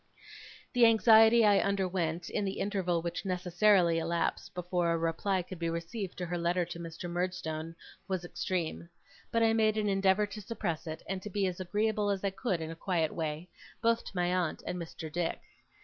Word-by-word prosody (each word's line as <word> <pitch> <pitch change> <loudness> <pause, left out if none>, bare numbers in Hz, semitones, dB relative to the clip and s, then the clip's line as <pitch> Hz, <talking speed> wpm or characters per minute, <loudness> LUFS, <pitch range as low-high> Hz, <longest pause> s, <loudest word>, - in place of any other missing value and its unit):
The 245 -2 +6
anxiety 225 0 +6
I 205 -1 +5
underwent, 180 -4 -1
in 210 - -2
the 195 0 -2
interval 180 -5 0
which 170 0 -3
necessarily 180 -1 +3
elapsed 170 +2 -2
before 175 -1 0
a 165 - +2
reply 165 +3 0
could 180 0 -9
be 165 -1 -1
received 170 +4 -4
to 180 - -3
her 175 0 -3
letter 175 +1 +1
to 170 0 -8
Mr. 170 +1 -6
Murdstone, 170 -2 -3 0.3
was 185 -2 -2
extreme; 170 -2 -3 0.4
but 230 0 +2
I 225 0 +4
made 220 -1 +3
an 210 -1 +1
endeavour 195 +1 +3
to 205 +1 -8
suppress 175 -7 -4
it, 160 0 -6
and 190 -1 -3
to 210 - -6
be 200 0 0
as 185 -1 -2
agreeable 210 +3 0
as 200 -1 -1
I 200 - +1
could 195 -3 -2
in 160 0 -4
a - - -7
quiet 165 -3 0
way, 160 +1 -3 0.3
both 230 0 +2
to - - -9
my 180 0 +1
aunt 180 -4 -1
and 180 0 -3
Mr. 160 -1 -7
Dick. 170 +1 -1
180 Hz, 195 wpm, -31 LUFS, 170-205 Hz, 0.4 s, The